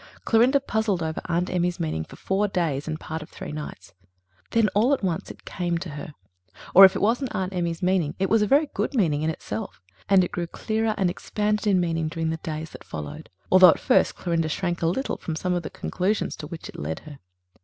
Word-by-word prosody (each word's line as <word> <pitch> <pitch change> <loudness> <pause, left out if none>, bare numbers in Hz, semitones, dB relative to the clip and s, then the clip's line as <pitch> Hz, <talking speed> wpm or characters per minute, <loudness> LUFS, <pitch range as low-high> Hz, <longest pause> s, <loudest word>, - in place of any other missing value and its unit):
Clorinda 245 +5 +4
puzzled 220 -9 -1
over 160 0 -3
Aunt 175 +1 -1
Emmy's 180 -1 0
meaning 155 - -2
for - - -13
four 195 +2 0
days 160 -7 -1
and 155 0 -3
part 160 0 -5
of 155 - -10
three - - -8
nights. 150 0 -8 0.6
Then 230 -2 +3
all 225 +9 +3
at 255 - -12
once 175 -4 -2
it - - -12
came 175 -2 -2
to 165 -1 -6
her. 150 +2 -8 0.6
Or 195 +2 +11
if 190 - +4
it - - -2
wasn't 240 +3 +1
Aunt 190 -1 -2
Emmy's 170 -1 -2
meaning 180 -4 +1
it 190 - +1
was 225 +1 +3
a 210 - +2
very 285 +7 +4
good - - -2
meaning 160 - +2
in 155 - 0
itself, 110 - -5 0.3
and 195 -2 +6
it 180 - -3
grew 175 -1 -3
clearer 220 +4 -1
and 185 -4 +2
expanded 210 +3 -1
in 195 -3 +4
meaning 165 -2 0
during 160 0 -2
the 160 - -2
days 160 0 -5
that - - -11
followed, 75 -2 -7 0.2
although 185 -1 +9
at - - +3
first - - +3
Clorinda 165 -2 -1
shrank 175 +2 -2
a 165 - +2
little 230 +11 -1
from 165 - -5
some 180 +3 -1
of 175 - 0
the - - -6
conclusions 195 +4 -1
to 150 - -7
which 160 +1 -8
it - - -10
led 75 +2 -4
her. 150 -3 -12
175 Hz, 230 wpm, -25 LUFS, 160-200 Hz, 0.6 s, Or